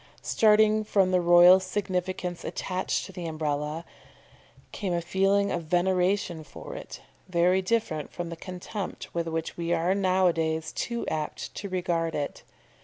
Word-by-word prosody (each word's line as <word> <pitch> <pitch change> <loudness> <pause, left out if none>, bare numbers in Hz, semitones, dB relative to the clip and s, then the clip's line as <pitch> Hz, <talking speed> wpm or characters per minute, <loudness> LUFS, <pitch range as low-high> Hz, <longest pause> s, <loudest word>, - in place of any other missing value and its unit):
Starting 215 0 +4
from 195 -3 +2
the 180 -1 +3
royal 175 +2 +8
significance 185 -2 -3
attached 185 0 -2
to - - -10
the 180 -2 -6
Umbrella, 155 0 -2 0.9
came 190 -4 -3
a - - +1
feeling 195 +3 +1
of 170 -2 -2
veneration 180 0 +1
for - - -10
it, - - -8 0.3
very 180 +2 +3
different 190 -7 -1
from 175 -1 -5
the 170 - -5
contempt 185 +3 -6
with 170 -1 -2
which 165 0 -3
we 170 0 -2
are 175 +3 +2
now 190 -1 +2
a 175 - +4
days 160 -1 -1
too 235 -1 -3
apt 155 -1 -4
to 200 - -6
regard 170 -3 -1
it. 145 -1 -3
180 Hz, 155 wpm, -27 LUFS, 165-190 Hz, 0.9 s, royal